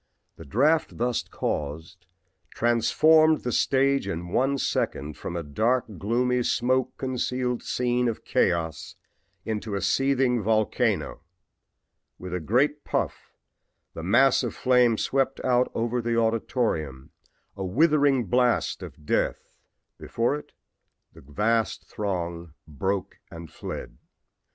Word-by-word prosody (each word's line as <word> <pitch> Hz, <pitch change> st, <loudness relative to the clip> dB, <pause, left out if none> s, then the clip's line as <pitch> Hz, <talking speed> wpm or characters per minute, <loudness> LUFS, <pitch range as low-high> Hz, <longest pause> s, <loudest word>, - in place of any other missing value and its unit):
The -, -, -12 dB
draft 150 Hz, -, +1 dB
thus 120 Hz, 0 st, 0 dB
caused 80 Hz, +5 st, -4 dB, 0.5 s
transformed 155 Hz, +7 st, +4 dB
the 125 Hz, -, -3 dB
stage 135 Hz, -1 st, +2 dB
in 85 Hz, -2 st, -4 dB
one 135 Hz, +8 st, +1 dB
second 75 Hz, -, -2 dB
from 85 Hz, -, -6 dB
a 85 Hz, -, -3 dB
dark, 110 Hz, -, +1 dB
gloomy, 125 Hz, +4 st, +1 dB
smoke 130 Hz, +1 st, 0 dB
concealed 125 Hz, -1 st, -2 dB
scene 125 Hz, 0 st, 0 dB
of 115 Hz, -, -4 dB
chaos 80 Hz, -3 st, 0 dB, 0.5 s
into 110 Hz, -1 st, -3 dB
a 100 Hz, -, -2 dB
seething 130 Hz, +3 st, +2 dB
volcano. 110 Hz, -4 st, 0 dB, 1.0 s
With 90 Hz, -1 st, -8 dB
a 90 Hz, -, -1 dB
great 135 Hz, -, +1 dB
puff -, -, -3 dB, 0.6 s
the -, -, -7 dB
mass 120 Hz, +10 st, +4 dB
of -, -, -4 dB
flame 125 Hz, -3 st, +3 dB
swept 135 Hz, +2 st, 0 dB
out 125 Hz, -1 st, +2 dB
over 120 Hz, +2 st, -1 dB
the 115 Hz, 0 st, -1 dB
auditorium, 110 Hz, -, -1 dB, 0.4 s
a 100 Hz, -, -5 dB
withering 140 Hz, -, +3 dB
blast 125 Hz, +5 st, +1 dB
of 75 Hz, -, -11 dB
death. -, -, -1 dB, 0.5 s
Before 115 Hz, +4 st, -1 dB
it 150 Hz, -, -9 dB, 0.6 s
the -, -, -15 dB
vast 105 Hz, +9 st, -1 dB
throng 85 Hz, -5 st, -4 dB
broke 95 Hz, +6 st, -3 dB
and 85 Hz, -2 st, -10 dB
fled. -, -, -7 dB
115 Hz, 120 wpm, -26 LUFS, 90-130 Hz, 1.0 s, transformed